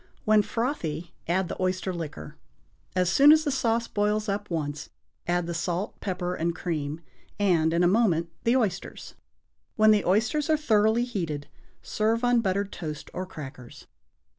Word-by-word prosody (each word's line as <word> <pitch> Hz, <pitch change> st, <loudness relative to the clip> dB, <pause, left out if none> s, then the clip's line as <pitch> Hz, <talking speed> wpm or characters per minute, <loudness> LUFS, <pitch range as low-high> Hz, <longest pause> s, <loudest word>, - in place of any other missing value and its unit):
When 215 Hz, 0 st, +5 dB
frothy 180 Hz, -, -3 dB
add 180 Hz, +2 st, +1 dB
the -, -, -6 dB
oyster 185 Hz, 0 st, -1 dB
liquor. 150 Hz, -, -7 dB, 0.6 s
As 180 Hz, -1 st, +2 dB
soon 280 Hz, +8 st, +7 dB
as 310 Hz, 0 st, +5 dB
the 295 Hz, -, 0 dB
sauce 230 Hz, -3 st, 0 dB
boils 210 Hz, +1 st, 0 dB
up 205 Hz, +1 st, -2 dB
once, 150 Hz, -3 st, -3 dB, 0.4 s
add 175 Hz, 0 st, +1 dB
the 170 Hz, -, -4 dB
salt, 175 Hz, +4 st, -3 dB
pepper 180 Hz, -2 st, -2 dB
and 170 Hz, -1 st, -1 dB
cream, 155 Hz, -3 st, -3 dB, 0.4 s
and, 170 Hz, -6 st, +3 dB
in 170 Hz, +1 st, +2 dB
a -, -, +5 dB
moment, 175 Hz, -5 st, +2 dB
the 235 Hz, +1 st, +3 dB
oysters. 200 Hz, -7 st, -3 dB, 0.6 s
When 215 Hz, 0 st, +6 dB
the 210 Hz, -2 st, +3 dB
oysters 220 Hz, -, +1 dB
are 310 Hz, -, +4 dB
thoroughly 220 Hz, -4 st, +3 dB
heated, 165 Hz, -12 st, -4 dB, 0.4 s
serve 225 Hz, +2 st, 0 dB
on 245 Hz, -1 st, +4 dB
buttered 200 Hz, 0 st, -1 dB
toast 155 Hz, -4 st, -7 dB
or 185 Hz, 0 st, -4 dB
crackers. 135 Hz, -8 st, -10 dB
185 Hz, 160 wpm, -26 LUFS, 170-220 Hz, 0.6 s, soon